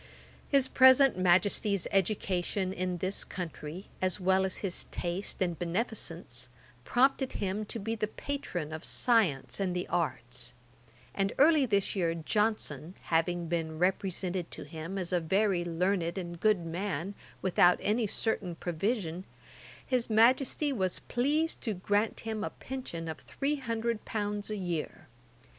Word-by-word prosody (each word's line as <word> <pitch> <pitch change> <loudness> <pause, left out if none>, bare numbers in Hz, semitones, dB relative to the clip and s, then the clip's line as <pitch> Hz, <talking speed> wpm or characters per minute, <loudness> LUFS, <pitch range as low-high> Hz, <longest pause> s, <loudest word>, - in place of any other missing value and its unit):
His 275 -2 +4
present 260 +1 +7
Majesty's 185 +2 +3
education 190 -1 0
in 180 -1 -2
this 185 +3 -1
country, 170 0 -6 0.2
as 185 +1 +1
well 190 +1 +3
as 190 - -2
his 185 - -1
taste 175 +3 -3
and 175 -3 -2
beneficence, 170 - -2 0.3
prompted 265 - +2
him 200 +2 -2
to 220 - -4
be 225 +1 -3
the 215 -1 -1
patron 180 - -4
of 160 +2 -6
science 210 - +2
and 185 -2 0
the 180 - -2
arts; 125 -6 -2 0.6
and 195 0 0
early 295 -1 +5
this 200 -2 +1
year 170 -3 +1
Johnson, 180 - -1 0.2
having 170 +1 +2
been 160 -2 -2
represented 185 0 0
to - - -4
him 165 +4 -6
as 185 -1 -2
a 180 - +4
very 190 +2 +1
learned 175 +1 0
and 175 -2 -5
good 205 -3 +2
man, 180 +1 -3 0.3
without 180 -1 +5
any 220 +1 +1
certain 195 -4 -1
provision, 175 +1 -2 0.6
his 250 -3 0
Majesty 255 +6 +3
was 185 -6 0
pleased 295 +6 0
to 220 -5 -2
grant 205 +4 0
him 220 -1 -3
a - - -1
pension 250 -11 -6
of 160 -1 -5
three 290 +2 -2
hundred 230 -3 -2
pounds 205 -1 -2
a 215 - -2
year. 170 -4 -4
190 Hz, 145 wpm, -30 LUFS, 170-220 Hz, 0.6 s, present